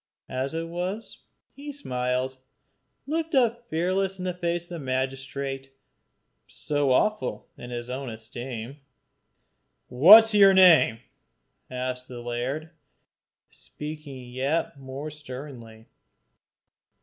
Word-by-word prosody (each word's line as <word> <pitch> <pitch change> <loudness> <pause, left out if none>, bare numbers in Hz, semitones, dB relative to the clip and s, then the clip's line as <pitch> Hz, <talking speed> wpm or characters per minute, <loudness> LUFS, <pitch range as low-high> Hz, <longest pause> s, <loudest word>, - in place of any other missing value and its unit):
As 130 +4 -3
it 165 0 -3
was, 180 +6 -5 0.3
he 290 +1 -8
smiled, 130 - -2 0.7
looking 320 -1 +1
up 235 -1 -1
fearless 185 +4 0
in 185 - -5
the 180 - -1
face 175 -1 -2
of 175 - -15
the 170 -2 -6
magistrate, 135 0 -3 0.8
so 145 -2 -1
awful 215 +11 +1
in 120 - -10
his 120 -1 -5
own 130 +1 -5
esteem. 120 +3 -7 1.1
"What 185 - +10
is 225 -1 -4
your 195 -2 +7
name?" 165 -11 +6 0.7
asked 125 0 -4
the 125 -1 -8
laird, 125 +7 -4 0.8
speaking 150 -5 -9
yet 140 +3 -1
more 135 +3 -7
sternly. 130 -6 -10
140 Hz, 110 wpm, -26 LUFS, 125-180 Hz, 1.1 s, What